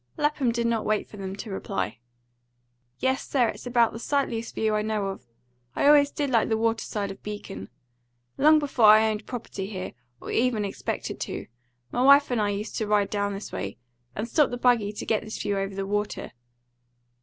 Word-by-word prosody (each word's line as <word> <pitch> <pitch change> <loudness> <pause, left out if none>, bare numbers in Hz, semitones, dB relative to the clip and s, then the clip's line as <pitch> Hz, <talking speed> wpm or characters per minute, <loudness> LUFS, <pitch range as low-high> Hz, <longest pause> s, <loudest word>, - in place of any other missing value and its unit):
Lapham 295 -4 +1
did 235 0 -1
not 230 -2 +1
wait 215 -1 0
for 210 - -12
them 195 -1 -5
to 210 +1 -7
reply. 190 - -3 1.0
"Yes, 260 0 -1
sir, 245 -5 +3
it's - - -7
about 235 -2 +3
the 225 - -6
sightliest 235 -4 -1
view 220 -1 +1
I 210 - +1
know 210 -2 -1
of. 190 -10 -8 0.5
I - - +1
always 285 -1 +7
did 285 -2 -2
like 230 -2 +3
the 220 - +2
water 225 0 0
side 200 -2 -3
of 195 - -11
Beacon. 205 - -7 0.7
Long 310 +2 +6
before 280 -6 +2
I 220 +1 +7
owned 215 0 -5
property 220 -5 -5
here, 190 -3 -6 0.3
or - - -7
ever 235 -3 +1
expected 200 - -4
to, - - -4 0.5
m'wife 280 +2 +6
and 240 -3 +1
I 205 - +1
used 205 +2 -4
to 215 - -1
ride 205 -1 +2
down 205 -1 -1
this 200 - -7
way, 100 +1 -5 0.4
and 215 +3 -3
stop 295 +4 +3
the 245 - -4
buggy 240 -4 +3
to 210 - -7
get 220 - +1
this 215 - -6
view 205 -1 -1
over 195 0 -2
the 195 0 -2
water. 205 +1 -2
220 Hz, 200 wpm, -26 LUFS, 205-245 Hz, 1.0 s, always